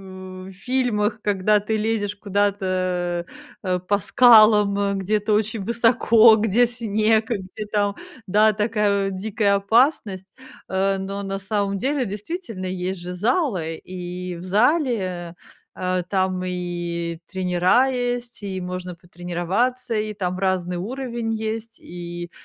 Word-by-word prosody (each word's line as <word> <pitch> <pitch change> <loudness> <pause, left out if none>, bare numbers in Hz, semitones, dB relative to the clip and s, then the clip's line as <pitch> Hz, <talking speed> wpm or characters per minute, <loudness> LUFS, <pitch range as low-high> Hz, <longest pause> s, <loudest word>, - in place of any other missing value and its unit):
в 185 -1 -10
в 190 - -9
фильмах, 240 -5 0
когда 205 +1 +2
ты 220 +2 -2
лезешь 210 -1 -1
куда-то, 185 -4 -1 0.4
э, 185 -2 0
по 190 +3 0
скалам, 210 -3 +5
где-то 210 +2 0
очень 215 0 0
высоко, 230 0 +5
где 225 +3 +3
снег, 225 -1 +1
где, 205 0 -4
там, 205 -1 +1 0.3
да, 210 +3 +4
такая, 210 -2 +1
э, - - -3
дикая 200 +1 0
опасность. 200 - +2 0.4
Э, 195 +1 +1
но 195 +1 -4
на 195 0 -3
самом 200 0 -1
деле, 270 +3 0
действительно, 210 - -6
есть 185 0 -3
же 180 +1 -6
залы, 195 - 0
и 180 +1 -6
в 170 - -9
зале, 245 - +2
э, 175 -2 -5 0.4
а, 185 0 -1
там, 185 -1 -1
и 175 -2 -3
тренера 185 +7 +2
есть, 245 -3 -3
и 190 -2 -4
можно 180 0 -5
потренироваться, 180 +9 -2
и 215 0 -2
там 185 -2 -3
разный 185 -2 0
уровень 235 +3 -3
есть, 220 +1 -5
и 175 0 -7
200 Hz, 130 wpm, -22 LUFS, 185-220 Hz, 0.4 s, скалам